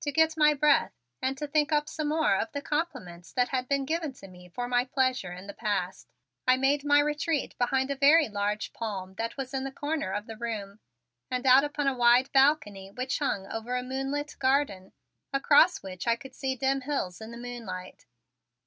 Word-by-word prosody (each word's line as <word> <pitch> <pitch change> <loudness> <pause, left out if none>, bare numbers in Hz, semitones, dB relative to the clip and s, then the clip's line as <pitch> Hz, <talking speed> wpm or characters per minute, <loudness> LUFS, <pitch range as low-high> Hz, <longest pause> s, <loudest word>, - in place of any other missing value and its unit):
To 290 - -1
get 320 +2 +3
my 300 -1 +4
breath 295 +1 +3 0.3
and 265 +1 -1
to 295 - -3
think 295 +1 +1
up 295 0 +2
some 310 -1 -3
more 310 -8 +2
of 220 - -2
the 285 - -3
compliments 185 - -4
that 250 -1 +1
had 255 -1 -2
been 275 0 0
given 315 -1 -2
to 195 - -13
me 180 -1 -15
for 245 +8 -4
my 245 0 +2
pleasure 255 -7 0
in 180 +2 -9
the 200 - -8
past, 195 -5 -3 0.4
I 255 0 +5
made 275 +2 +2
my 290 0 +4
retreat 300 0 -1
behind 265 +2 +1
a - - -1
very 290 +3 +5
large 205 0 -2
palm 195 -4 -5
that 230 +3 -3
was 270 0 -5
in 265 -1 -1
the 270 - -4
corner 290 -7 -3
of 205 +2 -3
the 225 -1 -9
room, 215 -3 -5 0.5
and 250 +1 -2
out 260 +1 +7
upon 295 0 -2
a 275 - +2
wide 245 +1 +4
balcony 265 -9 +2
which 255 +6 -3
hung 235 -9 -1
over 225 +4 -4
a 250 - -1
moonlit 270 +3 -3
garden 260 -8 +1 0.4
across 285 - +4
which 185 +2 -7
I 230 - +4
could 265 +3 -12
see 265 -1 -2
dim 270 +2 0
hills 250 -10 -3
in 220 - -8
the 235 - -9
moonlight. 230 -7 -8
260 Hz, 205 wpm, -28 LUFS, 215-290 Hz, 0.5 s, out